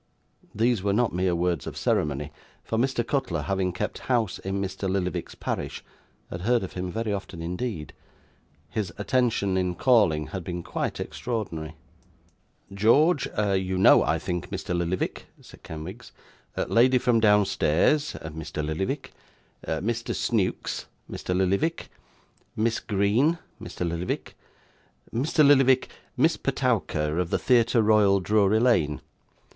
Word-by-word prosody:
These 115 0 +2
were 100 0 0
not 120 +1 +1
mere 90 0 +1
words 85 -3 -1
of - - -6
ceremony; 75 0 0 0.3
for, - - -3
Mr. 125 -2 0
Cutler, 120 - -1
having 95 +1 0
kept 100 +4 -4
house 115 -7 +1
in 95 +1 -3
Mr. 95 0 -3
Lillyvick's 95 -1 -2
parish, - - -4 0.5
had 85 - -5
heard 120 +3 +2
of 95 - -6
him 90 0 -4
very 110 +1 -2
often 95 -3 -6
indeed. 90 -1 -4 0.8
His 100 -6 -2
attention 105 -3 +1
in 90 -1 0
calling 95 -10 +3
had 95 -3 -5
been 85 0 -5
quite - - -3
extraordinary. 85 -10 -4 1.0
'George, 135 - +4 0.3
you 95 -1 0
know, 95 - +7
I - - +1
think, 90 -1 -4
Mr. 90 - -3
Lillyvick,' 85 +1 -2
said - - -16
Kenwigs; 90 +10 -8 0.5
'lady 125 +2 +4
from 120 -2 +2
downstairs 105 - +3
Mr. 80 -1 -5
Lillyvick. 95 - -3 0.6
Mr. 115 +3 -2
Snewkes 105 -6 -1 0.2
Mr. 90 - -3
Lillyvick. 100 - 0 0.7
Miss 115 +1 0
Green 110 - +2 0.2
Mr 90 - -4
Lillyvick. 85 +2 -3 0.8
Mr. 150 +5 +3
Lillyvick 135 -2 +5 0.3
Miss - - +3
Petowker 75 +2 0
of 90 -2 -1
the - - +1
Theatre 120 -2 +3
Royal, 105 -2 +4
Drury 105 +2 +3
Lane. 95 -12 +2
100 Hz, 130 wpm, -26 LUFS, 90-115 Hz, 1.0 s, know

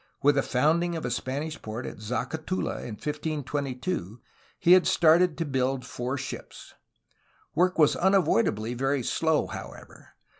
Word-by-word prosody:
With 145 +1 +6
the 140 - +2
founding 165 +7 +1
of 160 - -4
a 125 - -2
Spanish 140 +6 -3
port 110 +3 -6
at - - -7
Zacatula 135 - -3
in 110 - -6
1522, 145 - -3 0.4
he 175 - +3
had 185 0 +7
started 170 +1 +4
to 165 - -1
build 130 -2 -1
four 125 +1 -3
ships. 135 - -8 0.8
Work 180 +3 +2
was 150 -2 +5
una 190 +2 +4
voidably 115 - +1
very 135 +1 0
slow, 160 +4 +1
however. - - -10
145 Hz, 145 wpm, -27 LUFS, 125-160 Hz, 0.8 s, had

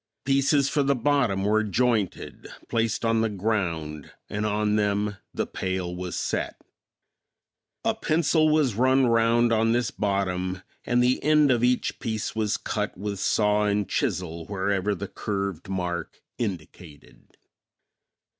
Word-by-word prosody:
Pieces 140 +1 +3
for 145 - +1
the 140 0 +2
bottom 120 -7 +1
were 110 +2 +2
jointed, 110 -1 -1 0.2
placed 115 0 0
on 115 0 +2
the 115 - +1
ground 85 -8 -2 0.2
and 105 +1 -1
on 105 0 +1
them 105 0 0
the - - -2
pail 95 -2 -3
was 90 0 -5
set. - - -2 1.3
A - - +3
pencil 155 0 +2
was 150 -6 +3
run 130 +4 +3
round 115 0 +3
on 115 +1 +3
this 120 -2 0
bottom 95 -2 -1 0.2
and 120 0 +3
the 125 +1 +1
end 150 -2 +4
of 120 -2 +2
each 125 0 +1
piece 110 -1 -3
was 105 -2 0
cut - - -3
with 100 0 -4
saw 105 +1 +2
and 105 -1 0
chisel 85 -2 -2
wherever 100 0 0
the 100 +2 -5
curved 100 -4 -4
mark 90 -3 -3 0.2
indicated. 85 -7 -7
105 Hz, 135 wpm, -26 LUFS, 95-120 Hz, 1.3 s, end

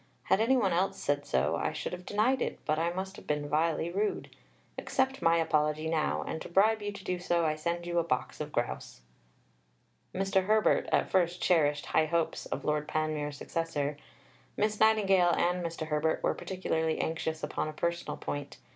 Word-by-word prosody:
Had 200 - +2
any 260 +4 +4
one 195 -7 +2
else 185 +3 +1
said 145 0 -1
so, 65 - +1
I - - -1
should - - -4
have 180 0 -8
denied 230 +6 +2
it, - - -2
but 155 0 +1
I 165 +1 +1
must 190 +2 -5
have - - -13
been 150 -1 -1
vilely 160 +2 +1
rude. 205 +3 -2 0.4
Accept 265 0 0
my 165 0 +4
apology 155 -1 +1
now; 160 -1 0
and 160 - -5
to - - -7
bribe 215 +5 +3
you 205 0 -3
to 200 -1 -10
do 180 -1 -2
so, 175 -1 +1
I 155 - +2
send 170 +3 -3
you 175 0 0
a - - +1
box 155 -2 -2
of 150 0 -5
grouse." 120 - -3 1.1
Mr. 190 0 +1
Herbert 215 +1 +3
at - - +2
first 180 -1 +2
cherished 150 -4 +2
high 155 - +2
hopes 165 0 -1
of - - -4
Lord 150 0 0
Panmure's 155 -2 -2
successor. 150 -3 -2 0.6
Miss 210 0 0
Nightingale 195 -5 +4
and 180 +1 +1
Mr. 165 -1 -4
Herbert 155 +1 0
were - - +2
particularly 160 -4 -2
anxious 160 0 -2
upon 150 +1 -2
a 155 - -5
personal 170 +2 -2
point. 145 0 -5
170 Hz, 190 wpm, -30 LUFS, 155-190 Hz, 1.1 s, any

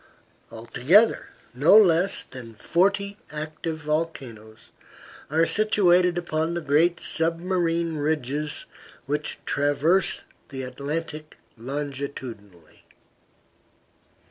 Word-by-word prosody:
Altogether, 130 - +2 0.3
no 145 - +6
less 185 -2 +4
than 120 -3 -11
forty 200 - 0
active 155 +1 -5
volcanoes 130 -8 -5 0.6
are 160 +3 +3
situated 180 -4 +3
upon 165 -1 -2
the 170 - -2
great 160 +4 +2
submarine 170 0 0
ridges 150 0 -2 0.4
which 150 +2 -3
traverse 145 +6 +1 0.3
the 130 -2 -6
Atlantic 150 +4 -5 0.2
longitudinally. 130 - -7
155 Hz, 80 wpm, -24 LUFS, 140-170 Hz, 0.6 s, no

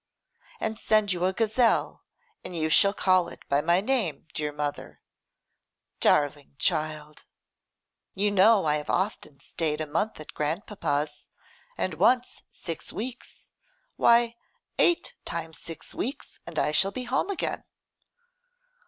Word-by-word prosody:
'And 220 0 -2
send 215 -3 +3
you 180 0 -1
a 185 - +3
gazelle, 225 +2 +2 0.4
and 180 - -6
you 160 -1 0
shall 200 +5 +6
call 185 -3 +3
it - - -14
by 140 +1 +2
my 170 +4 +3
name, 210 - -1
dear 150 -1 -2
mother.' 145 0 -5 1.0
'Darling 145 -1 +2
child!' 155 -2 -2 0.9
'You 205 +1 +1
know 205 0 +5
I 150 0 +3
have 150 - -7
often 185 -7 -2
stayed 150 +1 -2
a 155 - -1
month 165 +8 -2
at 155 - -10
grand 155 +6 -2
papa's, 150 -6 -2 0.5
and 185 - -1
once 240 +10 +2
six 165 -3 -6
weeks. 245 +3 -7 0.5
Why! 235 0 +4 0.4
eight 345 - +3
times 165 -1 -5
six 165 - -9
weeks, 270 +5 -5
and 165 -2 -8
I 150 - +2
shall 190 +6 +3
be 250 +5 -5
home 260 +9 0
again. 395 - -2
175 Hz, 135 wpm, -27 LUFS, 150-215 Hz, 1.0 s, shall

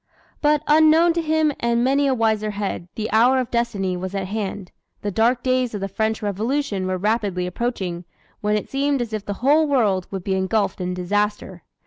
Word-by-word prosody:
But 295 0 +2
unknown 315 +2 +5
to 335 - 0
him 315 -1 +1
and 235 0 +1
many 275 +2 +2
a 265 - +2
wiser 220 -2 +1
head, 200 -4 -4
the 220 -1 -3
hour 240 +4 +4
of 255 -2 -2
destiny 200 -6 -1
was 185 +2 -5
at 195 -1 -2
hand. 200 -3 -4 0.3
The 205 - -1
dark 235 +4 +2
days 255 -3 0
of 205 - -4
the 195 - -2
French 220 +3 -2
Revolution 210 0 -1
were 185 0 -1
rapidly 200 -2 0
approaching, 180 -3 -3 0.3
when 210 0 +1
it 210 - -5
seemed 280 0 0
as 235 -3 -4
if 215 -2 -3
the 205 - -4
whole 305 +3 +5
world 210 -10 +1
would 190 -2 -5
be 190 - -1
engulfed 190 +1 0
in 180 0 -2
disaster. 200 0 -2
220 Hz, 195 wpm, -22 LUFS, 195-255 Hz, 0.3 s, unknown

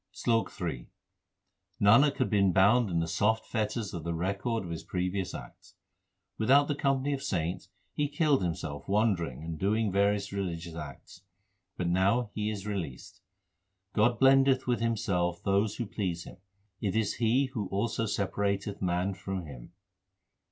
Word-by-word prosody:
SLOK 115 +3 0
III 80 -10 -4 0.9
Nanak 120 +9 +5
had 130 - +1
been 100 -3 +3
bound 100 +5 +4
in 85 -2 0
the 80 - -1
soft 105 +7 +1
l - - -23
fetters 110 -1 -2
of 85 -3 -5
the 85 0 -2
record 100 +6 -1
of 85 - -7
his 80 - -4
previous 90 +1 -2
acts. - - -11 0.6
Without 140 +6 +5
the 145 - 0
company 140 0 0
of 135 - -3
saints 90 -4 -2 0.2
he 150 - 0
killed 145 -3 +2
himself 80 -5 -4
wandering 95 - +1
and 80 -1 -5
doing 105 +2 +1
various 100 +1 +1
religious 85 -4 -4
acts, 75 +1 -9 0.6
but 90 - -1
now 100 +6 +2
he 105 0 -1
is 105 -2 -5
released. 90 -11 -5 0.7
God 115 +2 +2
blendeth 135 0 +5
with 125 -1 +1
Himself 90 -7 0
those 100 +2 +1
who 120 - -3
please 95 -5 -3
Him; - - -12 0.4
it 100 -1 -1
is 110 -2 0
He 125 +3 +2
who 105 -7 -2
also 110 +3 -1
separateth 100 0 -1
man 90 +1 0
from 95 0 -5
Him. 65 -5 -11
100 Hz, 160 wpm, -29 LUFS, 90-115 Hz, 0.9 s, Nanak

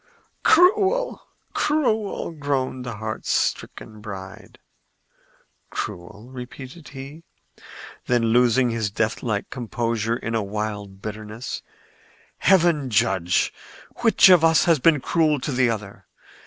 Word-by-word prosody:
"Cruel! 415 +7 +3 0.3
cruel!" 220 - 0
groaned 140 -4 -2
the 120 -2 -5
heartstricken 110 0 -3
bride. 100 0 -9 1.1
"Cruel?" 100 +6 -6
repeated 130 +4 -9
he; 140 +3 -10 0.9
then, 120 -1 +2
losing 125 0 +3
his 110 -2 -1
deathlike 110 0 -2
composure 115 -2 -2
in 115 - -5
a 115 - +1
wild 105 -1 -5
bitterness, 110 +3 -6 0.8
"Heaven 170 -7 +3
judge 95 -4 +1 0.4
which 225 -4 +5
of 180 -3 +7
us 160 -1 +5
has 165 -4 +4
been 150 0 +4
cruel 155 -2 +1
to 145 - -3
the 125 -1 +2
other! 105 -3 -6
125 Hz, 105 wpm, -23 LUFS, 110-155 Hz, 1.1 s, of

